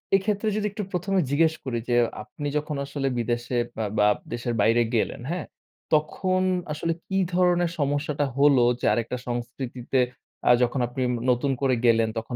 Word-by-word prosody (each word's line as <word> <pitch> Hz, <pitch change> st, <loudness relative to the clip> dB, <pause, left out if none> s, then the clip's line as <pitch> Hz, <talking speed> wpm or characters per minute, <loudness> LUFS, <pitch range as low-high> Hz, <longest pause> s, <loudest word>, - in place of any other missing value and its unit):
এক্ষেত্রে 205 Hz, +2 st, 0 dB
যদি 210 Hz, -1 st, -1 dB
একটু 210 Hz, 0 st, -4 dB
১ম 185 Hz, +2 st, -2 dB
এ -, -, +4 dB
জিজ্ঞেস 160 Hz, +2 st, +3 dB
করি 120 Hz, -3 st, -2 dB
যে 120 Hz, -, +3 dB, 0.3 s
আপনি 145 Hz, +6 st, -6 dB
যখন 150 Hz, 0 st, -3 dB
আসলে 140 Hz, -1 st, -3 dB
বিদেশে 120 Hz, +1 st, -1 dB, 0.2 s
বা 110 Hz, -, -1 dB
বা 105 Hz, 0 st, +5 dB, 0.3 s
দেশে 120 Hz, +1 st, -3 dB
বাইরে 115 Hz, +3 st, +4 dB
গেলেন 110 Hz, -, 0 dB
হ্যাঁ? 180 Hz, -, -3 dB, 0.5 s
তখন 185 Hz, +5 st, +1 dB, 0.3 s
আসলে 165 Hz, +2 st, -1 dB
কি 190 Hz, -, -1 dB, 0.2 s
ধরনের 175 Hz, -1 st, +3 dB
সমস্যাটা 145 Hz, +1 st, 0 dB
হলো 140 Hz, -3 st, +5 dB, 0.2 s
যে -, -, -3 dB
আরেকটা 120 Hz, +2 st, -2 dB
সংস্কৃতিতে 120 Hz, +1 st, -3 dB, 0.5 s
আ -, -, +9 dB
যখন 125 Hz, +2 st, 0 dB
আপনি 125 Hz, +2 st, -5 dB, 0.3 s
নতুন 125 Hz, +3 st, +1 dB
করে 130 Hz, -2 st, +3 dB
গেলেন 115 Hz, -1 st, +4 dB
তখন 115 Hz, +2 st, -4 dB
140 Hz, 165 wpm, -25 LUFS, 120-165 Hz, 0.5 s, আ